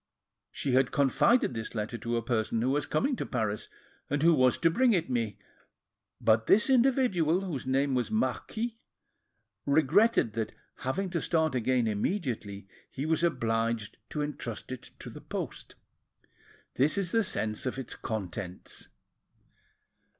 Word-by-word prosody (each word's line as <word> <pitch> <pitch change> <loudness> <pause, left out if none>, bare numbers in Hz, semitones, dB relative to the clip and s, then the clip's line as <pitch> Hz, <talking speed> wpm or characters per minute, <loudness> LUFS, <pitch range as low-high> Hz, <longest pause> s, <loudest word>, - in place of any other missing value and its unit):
She 140 - -2
had 130 0 +4
confided 145 - +3
this 110 0 -5
letter 110 +2 -3
to 120 0 -2
a 115 - -2
person 115 -1 0
who 130 - +2
was 145 +1 0
coming 260 - +1
to - - -2
Paris, 110 -4 -2 0.4
and 145 +1 0
who 170 0 +6
was 130 -4 +4
to 165 -1 +3
bring 245 +6 +4
it 165 -8 0
me; 115 -4 -1 0.8
but 110 0 +3
this 215 +6 +4
individual, 235 - +3
whose 155 -10 -4
name 135 +1 +2
was 125 -1 0
Marquis, 225 +1 -2 0.9
regretted 155 - +4
that 110 0 -3 0.2
having 180 +9 -2
to 170 - -1
start 160 -3 +1
again 125 0 +1
immediately, 105 - -2 0.2
he 135 - -4
was 160 +1 +1
obliged 115 -7 0
to 150 - -2
entrust 130 -6 -6
it 130 - -7
to - - -9
the - - -10
post. - - -6 1.0
This 145 +8 +3
is 190 -3 0
the 225 - +3
sense 110 - -1
of 130 - -3
its 135 - -5
contents. 95 -4 -5
135 Hz, 150 wpm, -29 LUFS, 115-175 Hz, 1.0 s, who